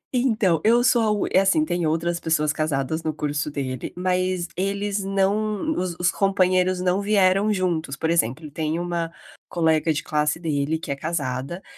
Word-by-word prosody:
Então, 220 - +2
eu 235 +2 +4
sou 240 -2 +4
a 220 - +2
uni 210 -1 0
é 190 - +6
assim, 250 +11 +3
tem 175 - -1
outras 170 +2 -1
pessoas 155 -2 +1
casadas 155 +1 -1
no 155 - -1
curso 150 0 -2
dele, 130 -4 -4
mas 185 -1 0
eles 200 +1 -2
não 205 +6 0
os 180 -2 -2
os 180 +1 +2
companheiros 185 -2 +2
não 180 +2 +1
vieram 200 0 +3
juntos. 170 -7 -1
Por 160 +4 -1
exemplo, 150 -1 0
tem 155 +1 -2
uma 170 -1 -2 0.4
colega 160 -1 +2
de 155 - -2
classe 150 +1 0
dele 155 -1 -1
que 160 - -6
é - - -1
casada, 145 +1 -3
175 Hz, 175 wpm, -23 LUFS, 155-195 Hz, 0.4 s, é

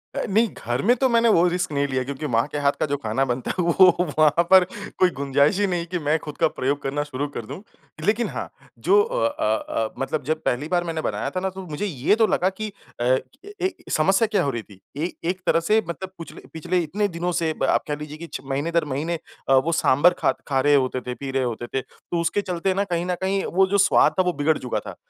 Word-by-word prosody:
अ, - - -1
नहीं 220 +4 +3 0.2
घर 120 +2 -1
में 245 +4 +4
तो 260 +2 +3
मैंने 230 0 +4
वो 175 -3 +5
रिस्क 180 -1 -1
नहीं 140 0 0
लिया 130 -1 -1
क्योंकि 140 +3 -5
माँ 115 0 +2
के 145 - -3
हाथ 140 -1 +3
का - - +2
जो 145 -1 -1
खाना 130 0 -1
बनता 125 0 -2
है 180 - +1
वो 180 +2 +6 0.3
वहाँ 155 +2 +4
पर 190 -1 +9 0.4
कोई 185 - +5
गुंजाइश 140 +7 +2
ही 205 - +2
नहीं 175 -2 -1
कि 180 0 -3
मैं 150 +1 +1
खुद 150 -1 -9
का 165 - +3
प्रयोग 140 -1 -2
करना 145 +2 -2
शुरू 145 0 -4
कर 120 -6 -7
दूँ। 185 - -8 0.4
लेकिन 225 +3 +1
हाँ - - -5 0.3
जो 415 +2 +4
अ, - - 0
अ, 290 - -4 0.3
अ, 110 -1 -2
मतलब 145 +2 -2
जब 155 +1 -2
पहली 135 +5 0
बार 175 0 +1
मैंने 165 -2 -3
बनाया - - -2
था 185 - -3
ना 190 +1 -1
तो 190 0 -9
मुझे 155 +6 -3
ये 155 +1 +1
तो 225 -1 +3
लगा 185 - +2
कि 210 +2 -6 0.3
अ, 130 +2 +3 0.4
ए 375 +1 0 0.2
समस्या 195 +7 +3
क्या 205 -4 +1
हो 140 - 0
रही 115 -2 -4
थी। 100 -3 -17 0.2
ए 165 +4 -2 0.2
एक 185 0 -2
तरह 165 - +3
से 215 +6 +2
मतलब 185 +2 -5
पूछले 165 - -10
पिछले 165 +3 -1
इतने 205 +6 -1
दिनों 175 0 -3
से 165 -2 0 0.2
आप - - +2
कह 150 - -1
लीजिए 150 0 -8
कि 170 +1 -8
छ - - -3
महीने 140 +5 -2
दर 170 -2 +1
महीने 155 +4 -2 0.3
अ, - - +5
वो 135 +5 +3
सांभर 165 +2 +4
ख - - +5 0.2
खा 135 -2 +1
रहे 145 +1 +4
होते 130 -2 +1
थे, 125 - -5
पी 135 -1 -6
रहे 135 -1 0
होते 120 0 -3
थे, 135 - -2
तो 170 - -6
उसके 170 +5 0
चलते 185 0 -1
ना 200 +1 +1
कहीं 175 -2 -2
न 180 -1 -1
कहीं 195 +1 0
वो 190 +2 +5
जो 200 +1 +1
स्वाद 195 - +5
था 185 - +5
वो 180 -1 0
बिगड़ 150 +2 +1
चुका 125 - -3
था। - - -9
165 Hz, 255 wpm, -23 LUFS, 140-190 Hz, 0.4 s, पर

